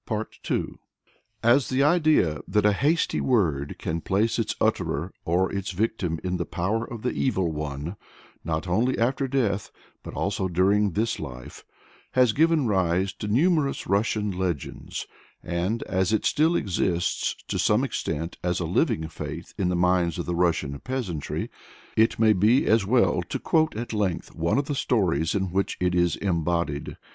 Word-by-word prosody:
pp. - - -1 0.2
244 - - -2 0.7
7.] 120 - +8
As 135 -5 0
the 130 +1 +2
idea 150 - +3
that 105 -1 +1
"a 105 - +5
hasty 150 - +1
word" 80 - +1
can 80 +1 -3
place 105 +7 +1
its 115 - -1
utterer 80 +7 0
or 90 +3 +1
its 100 -1 -3
victim 95 -4 -1
in 90 0 -1
the - - -2
power 105 +6 -1
of 115 -1 -8
the 125 - 0
Evil 95 -10 0
One 75 +4 -5 0.5
(not 80 +2 -2
only 115 +9 +1
after 130 +4 +1
death, 115 -7 0 0.3
but - - -9
also 95 - -1
during 95 +2 +2
this 115 +5 0
life) 65 -4 -8 0.5
has 125 -4 +4
given 160 0 +3
rise 95 -2 +1
to 105 - -6
numerous 145 - +2
Russian 105 +1 +1
legends, 90 -6 -4 0.4
and 90 +6 -1
as 95 +1 0
it 110 - +1
still 160 +3 +3
exists, 90 - 0
to - - -2
some - - +3
extent, 80 +3 -3
as 90 -1 0
a - - -2
living 80 0 +1
faith 80 +1 -7
in 95 -3 0
the 90 - 0
minds 90 -1 +2
of 85 - -3
the 85 - -2
Russian 80 -5 0
peasantry, 115 - -4 0.4
it 110 +1 +3
may 110 -1 +5
be 105 +7 +3
as 110 -3 +3
well 100 -7 +3
to - - -1
quote 160 -5 +1
at 115 +1 -4
length 100 -5 -1
one 85 +5 0
of 140 - +1
the 145 - -2
stories 95 - +1
in 95 -2 -1
which 95 +2 -1
it 90 -1 +1
is 85 -2 +2
embodied. 85 -5 -1
95 Hz, 170 wpm, -25 LUFS, 85-115 Hz, 0.7 s, 7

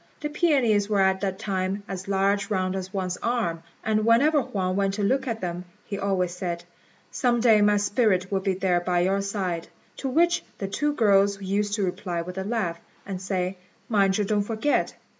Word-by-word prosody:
The 295 - -3
peonies 255 - +2
were 205 -2 +2
at 190 0 +2
that 190 -2 -1
time 195 -1 -2
as 190 -1 -6
large 200 +1 +1
round 185 -2 0
as 190 0 -5
one's 185 -2 -2
arm; 225 -9 -1 0.2
and 215 -1 +1
whenever 280 +7 +4
Huang 185 -6 -2
went 195 0 +1
to 205 - -2
look 265 +6 +1
at 225 -2 -3
them, 175 0 -3 0.2
he 200 -1 -5
always 185 -3 0
said, 175 -1 -4 0.5
"Some 240 -2 +1
day 225 -3 +5
my 205 0 +4
spirit 205 -2 +1
will 195 - +1
be 190 0 -1
there 180 -2 +1
by 175 0 0
your 195 +2 +1
side;" 190 -4 -3 0.3
to 270 - -3
which 345 +6 +2
the 195 - -3
two 295 +9 0
girls 200 -5 +3
used 200 +1 -1
to 205 -3 0
reply 180 -2 -3
with 180 +2 -6
a - - -2
laugh, 190 -6 -2 0.3
and 190 -2 -5
say, 185 -1 -2 0.3
"Mind 195 -3 +3
you 210 - +1
don't 210 +1 +1
forget." 225 +7 0
200 Hz, 195 wpm, -25 LUFS, 185-215 Hz, 0.5 s, day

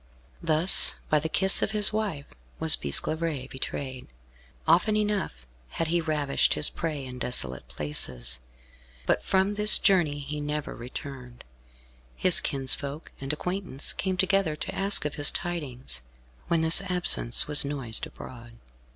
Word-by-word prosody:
Thus, 165 +2 +4 0.2
by 155 - +4
the 160 +2 -3
kiss 190 +3 +4
of - - 0
his 210 0 +6
wife, 200 -10 -3 0.3
was 160 0 +6
Bisclavaret 150 - -3
betrayed. 130 -1 -5 0.6
Often 210 +5 +3
enough 205 - -2 0.3
had 165 -1 -1
he 170 +1 +1
ravished 150 -3 +1
his 150 - +2
prey 155 -5 -4
in 125 -1 -9
desolate 70 - -2
places, 65 -4 -4 0.7
but - - +1
from 190 +1 +1
this 210 +1 +7
journey 175 -8 +2
he 145 +1 -5
never 150 0 -4
returned. 125 0 -9 0.7
His 185 -2 +2
kinsfolk 140 +2 -2
and 135 +1 -3
acquaintance 180 -2 -3
came 190 -1 -2
together 190 -4 +1
to - - -6
ask 195 -4 0
of 150 - -2
his 145 - +6
tidings, 130 - -5 0.5
when 170 -1 +1
this 160 +4 +4
absence 175 -9 +2
was 150 0 +5
noised 135 -6 +1
abroad. 120 -2 -12
150 Hz, 140 wpm, -26 LUFS, 130-180 Hz, 0.7 s, this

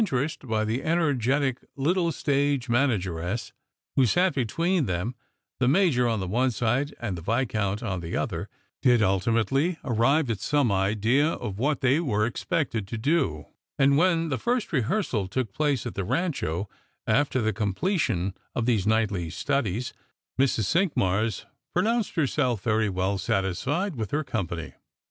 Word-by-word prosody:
rest 135 +2 -2
by 110 -1 0
the 115 +4 -1
energetic 140 -5 +1 0.2
little 170 +5 +1
stage 140 -4 0
manageress 105 -6 0 0.4
who - - +4
eat 175 - +3
between 160 - 0
them, 90 +7 -2 0.5
the 125 - +2
Major 140 -5 +3
on 115 -2 0
the 95 - -3
one 125 +7 +2
side 125 +5 0
and 110 -6 -3
the 85 - -7
Viscount 105 -1 -1
on 95 -2 -2
the 85 -1 -4
other, - - -3 0.3
did 120 -3 +4
ultimately 115 - +1
arrive 135 +5 +2
at 105 - -3
some 145 -1 +1
idea 110 +9 +2
of 105 -4 -5
what 145 +4 0
they 135 +3 +3
were 105 -10 +1
expected 120 - -2
to 115 - -4
do; 110 - 0 0.3
and 140 0 +4
when 165 0 +2
the 130 - -1
first 240 -5 -1
rehearsal 125 - 0
took 110 +1 -3
place 145 -5 0
at - - -4
the 100 - -3
Rancho, 110 - -1 0.4
after 130 +4 +2
the 110 -2 0
completion 100 - 0 0.2
of 120 - 0
these 110 -5 +1
nit^htly 105 -7 +1
studies, 120 - -1 0.5
Mrs. 130 -4 +2
Cinqmars 110 - +1 0.3
pro 180 - +3
nounced 230 0 0
herself 130 - 0
very 110 -2 +2
well 95 +1 -1
satisfied 125 - -1
x^h 110 -6 -4
her 155 +2 0
company. 85 - -4
120 Hz, 155 wpm, -26 LUFS, 105-145 Hz, 0.5 s, who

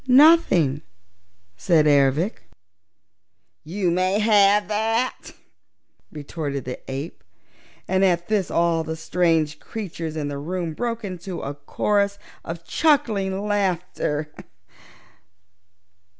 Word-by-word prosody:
"Nothing," 250 - +5 0.7
said 165 - +3
Ervic. 140 - +2 1.1
"You 180 +3 -1
may 185 +3 +1
have 210 -1 +4
that!" 225 +4 -1 0.8
retorted 145 -2 -5
the 125 - -5
ape, 140 +5 -6 0.6
and 190 +1 +1
at 175 -2 +2
this 210 -4 0
all 170 -1 +1
the 160 0 -4
strange 160 -2 0
creatures 165 -7 -6
in 150 -2 -3
the 140 -1 -4
room 170 +2 -3
broke 230 +5 -3
into 185 -1 -6
a 140 - -4
chorus 200 +8 0 0.3
of 165 0 -7
cackling 210 -11 +1
laughter. 180 -6 -1
175 Hz, 100 wpm, -23 LUFS, 155-205 Hz, 1.1 s, Nothing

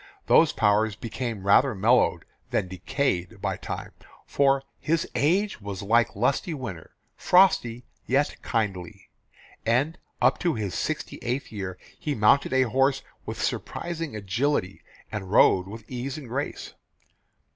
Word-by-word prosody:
Those 160 -1 +5
powers 105 0 +2
became 115 -2 -5
rather 120 +5 +4
mellowed 115 +6 +3 0.2
than - - 0
decayed 95 0 -2
by - - -1
time, - - -6 0.3
for 135 -1 +2 0.2
"his 160 +1 0
age 170 - +1
was 100 -1 -6
like 115 +4 +2
lusty 135 - 0
winter, 105 - -8 0.2
frosty 125 -11 +3 0.2
yet 140 +3 +1
kindly," 100 -6 -3 0.5
and 135 +9 +1 0.2
up - - +3
to 170 -4 0
his 105 -5 -3
sixty - - -3
eighth 125 +4 -3
year 95 -4 -5 0.2
he 150 -2 -2
mounted 110 +7 +4
a 130 0 +4
horse 135 +3 +1 0.2
with - - -5
surprising 165 -6 -3
agility 105 0 -1 0.3
and 100 -3 -5
rode 95 -2 +5
with 110 +2 -9
ease 130 +3 -4
and 140 -6 -9
grace. 140 +5 -4
120 Hz, 135 wpm, -26 LUFS, 100-140 Hz, 0.5 s, Those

